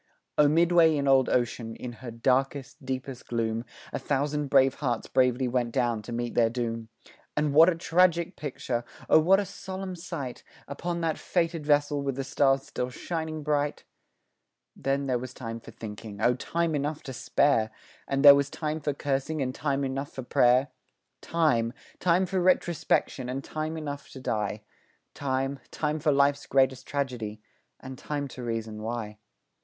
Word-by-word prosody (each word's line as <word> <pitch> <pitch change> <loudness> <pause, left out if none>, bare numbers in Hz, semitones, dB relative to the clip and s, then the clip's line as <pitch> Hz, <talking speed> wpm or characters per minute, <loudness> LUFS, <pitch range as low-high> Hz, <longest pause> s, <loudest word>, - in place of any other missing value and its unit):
O 150 - +5
midway 165 +1 +5
in 140 -1 0
old 135 -2 +5
ocean, 120 -2 -1
in 125 - -6
her 125 - -6
darkest, 130 +3 0
deepest 130 -1 -5
gloom, 115 -1 -1 0.3
A - - -1
thousand 145 +1 -1
brave 135 -1 +5
hearts 125 -5 -1
bravely 125 0 +2
went 120 -1 0
down 120 -3 0
to 105 - -9
meet 120 0 -3
their 115 -1 +4
doom, 115 -1 -3 0.5
And 150 -1 +1
what 160 +4 +8
a 180 - +1
tragic 170 +1 +2
picture! 130 -4 -3 0.2
Oh, - - +7
what 185 +5 +5
a 205 - -1
solemn 190 -1 -6
sight 165 -7 -6 0.2
Upon 170 +4 -3
that 160 -1 -1
fated 165 -3 -1
vessel 145 -1 +3
with 135 -2 -2
the 135 - -2
stars 135 0 +2
still 125 -2 -4
shining 160 +2 -4
bright! 145 -1 0 0.9
Then 140 +1 -1
there 130 -2 0
was 125 0 -8
time 115 -2 -6
for 115 - -13
thinking 105 -2 -8
O 120 +3 +4
time 165 +6 -1
enough 150 +1 -2
to 130 - -6
spare, 125 -3 +2 0.4
And 135 +1 +1
there 140 - +13
was 140 0 +1
time 155 +1 -3
for 145 -2 -2
cursing 140 +2 -1
and 130 -2 -1
time 140 -1 -1
enough 135 +1 -3
for 130 - -6
pray'r, 125 +3 +4 0.5
Time, 125 -9 +1 0.3
time 180 +1 +3
for 185 0 -1
retrospection, 175 -7 +1
and 135 +2 -3
time 155 +1 -4
enough 145 -2 -6
to 135 - -8
die, 105 -4 -2 0.5
Time, 135 0 -2
time 155 0 -2
for 150 0 +2
life's 140 0 +2
great 135 -1 +4 0.2
tragedy 125 -7 -3 0.4
and 130 -1 -9
time 145 -1 -3
to 125 - -9
reason 115 -2 -4
why. 110 -2 -4
135 Hz, 170 wpm, -28 LUFS, 125-155 Hz, 0.9 s, there